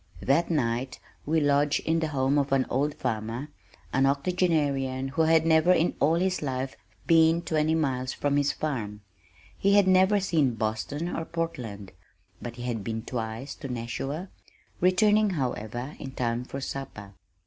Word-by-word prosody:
That 155 +6 +2
night 130 -4 -1 0.3
we 160 +1 +3
lodged 145 0 +2
in 165 +1 +1
the 160 - 0
home 140 -1 +1
of 140 -1 -1
an 135 -1 +3
old 145 +3 0
farmer, 115 +3 -3 0.4
an 135 +1 +3
octogenarian 140 -4 0
who 160 +4 0
had 160 0 +4
never 160 +2 +4
in 175 -1 +3
all 155 +4 +3
his 185 +2 0
life 130 -2 -3 0.3
been 165 0 +4
twenty 155 0 +1
miles 130 -5 -1
from 145 0 0
his 145 0 +2
farm. 110 -9 -4 0.5
He 200 +1 +2
had 200 -2 +5
never 190 +2 +5
seen 155 -10 +1
Boston, 115 +10 -3
or 165 - -2
Portland, 125 - -5 0.5
but 120 -1 -6
he 120 - -8
had 120 -4 -3
been 110 +1 -4
twice 115 +3 -4
to 145 - -7
Nashua, 135 +8 -4 0.5
returning, 210 +4 +4
however, 125 +1 -3
in 135 -2 -7
time 120 -1 -2
for 135 +2 -6
supper. 110 -8 -6
140 Hz, 160 wpm, -27 LUFS, 125-160 Hz, 0.5 s, had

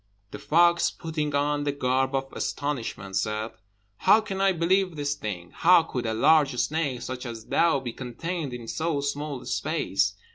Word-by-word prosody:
The - - -7
fox, 170 +2 +4
putting 155 -3 -3
on 145 +1 +1
the 145 - 0
garb 130 0 0
of 135 0 -3
astonishment, 120 -9 -3
said, 110 +3 -2 0.5
"How 205 +3 +5
can 195 -3 -4
I 195 0 +4
believe 185 +1 +1
this 145 -1 -1
thing? 95 -10 -6
How 175 0 +5
could 125 -7 -4
a 110 - 0
large 145 +2 +4
snake 145 -3 -1
such 130 0 -5
as 115 -3 -7
thou 165 -5 +2
be 120 -3 -6
contained 150 +4 -4
in 120 -2 -7
so 160 +3 -1
small 145 0 -3
a - - -12
space?" 100 - 0
145 Hz, 175 wpm, -26 LUFS, 125-165 Hz, 0.5 s, How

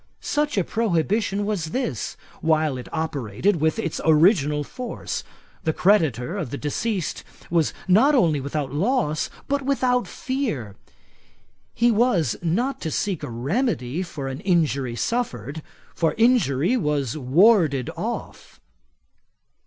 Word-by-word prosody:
Such 295 -4 -1
a 195 - +3
prohibition 205 +1 0
was 205 -6 -1
this, 160 - -3 0.2
while 155 -3 +2
it 125 - -7
operated 160 - -1
with 160 +5 +1
its 165 -8 -3
original 155 -2 +4
force. 245 - -5 0.4
The 160 - +1
creditor 165 - +2
of 160 - -3
the 140 - -4
deceased 185 +6 -2 0.3
was 165 -3 +2 0.2
not 240 +11 +5
only 165 - +3
without 140 -1 -3
loss, 155 - 0 0.2
but 280 0 0
without 255 -2 +1
fear. 220 - -3 1.0
He 235 +1 +4
was 200 - +2
not 230 +12 -1
to 160 - -2
seek 185 +2 -1
a - - -5
remedy 140 - -1
for 155 -7 -5
an 135 +1 -5
injury 145 -9 +1
suffered; 145 - -2 0.3
for, 165 -2 0
injury 225 - +3
was 150 - 0
warded 155 - +3
off. - - -6
165 Hz, 125 wpm, -23 LUFS, 145-225 Hz, 1.0 s, not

